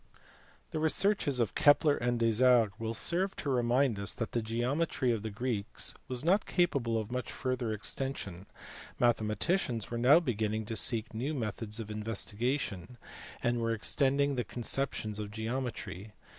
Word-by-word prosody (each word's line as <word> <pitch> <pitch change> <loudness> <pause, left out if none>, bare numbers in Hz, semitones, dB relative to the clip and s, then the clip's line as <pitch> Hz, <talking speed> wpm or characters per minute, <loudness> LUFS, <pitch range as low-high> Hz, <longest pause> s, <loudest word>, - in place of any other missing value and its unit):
The 155 - -2
researches 160 -3 +2
of 115 - 0
Kepler 145 0 +5
and 120 0 -1
Desargues 115 -2 +3
will 115 0 -3
serve 185 - +1
to 140 - -3
remind 125 -2 +2
us 100 +1 -1
that 115 - -3
as - - -37
the 120 - 0
geometry 125 +4 0
of 115 -3 -1
the 110 - -4
Greeks 110 0 -3
was 130 +2 -3
not 195 +5 +3
capable 140 -10 +1
of 110 +1 -4
much 125 0 -3
further 130 -3 -2
extension, 105 -4 -2 0.5
mathematicians 120 - 0
were 120 - -2
now 135 +7 +7
beginning 110 -7 -2
to 115 - -5
seek 115 +1 +3
for 110 - -8
new 140 +7 -2
methods 110 -2 -4
of 110 -1 -6
investigation, 110 0 -3 0.5
and 120 0 +1
were 115 0 0
extending 140 +5 +2
the 125 - 0
conceptions 115 -4 -2
of 105 -1 -4
geometry. 110 -3 -5
120 Hz, 155 wpm, -31 LUFS, 110-135 Hz, 0.5 s, now